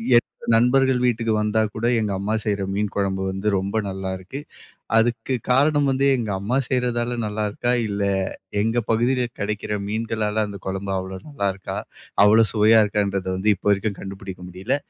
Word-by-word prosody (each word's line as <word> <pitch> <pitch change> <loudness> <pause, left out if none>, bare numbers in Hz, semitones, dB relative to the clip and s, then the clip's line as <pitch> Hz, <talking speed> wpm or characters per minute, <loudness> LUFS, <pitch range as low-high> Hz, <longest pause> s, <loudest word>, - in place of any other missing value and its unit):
என்னோட 120 - +4 0.3
நண்பர்கள் 125 +2 +4
வீட்டுக்கு 115 -2 +1
வந்தா 105 +1 +1
கூட, 115 +2 -2
எங்க 105 -2 -1
அம்மா 100 +2 -1
செய்யற 100 -2 -1
மீன் 105 -1 -1
குழம்பு 95 -1 0
வந்து 95 +2 -4
ரொம்ப 95 +3 -3
நல்லாருக்கு. 95 +6 -5 0.6
அதுக்கு 115 +2 +1 0.2
காரணம் 145 +3 +4
வந்து, 135 +1 +1
எங்க 115 -3 -3
அம்மா 110 +7 0
செய்யறதால 120 -1 0
நல்லா 105 0 -2
இருக்கா, 120 +4 -1 0.2
இல்ல 100 -1 -2 0.6
எங்க 115 +3 +1
பகுதில 120 +3 +2
கிடைக்கிற 105 0 -2
மீன்களால 110 0 -1
அந்த 100 -1 -8
குழம்பு 95 +1 -3
அவ்வளவு 95 0 -6
நல்லா 140 -9 -1
இருக்கா, 95 - -6 0.5
அவ்வளவு 110 +1 +5
சுவையா 110 +1 +6
இருக்கான்றத 100 -2 -1
வந்து 105 +3 +3
இப்ப 95 - -23
வரைக்கும் 100 0 0
கண்டுபிடிக்க 95 -1 -8
முடியல. 95 +9 -1
105 Hz, 155 wpm, -23 LUFS, 100-120 Hz, 0.6 s, சுவையா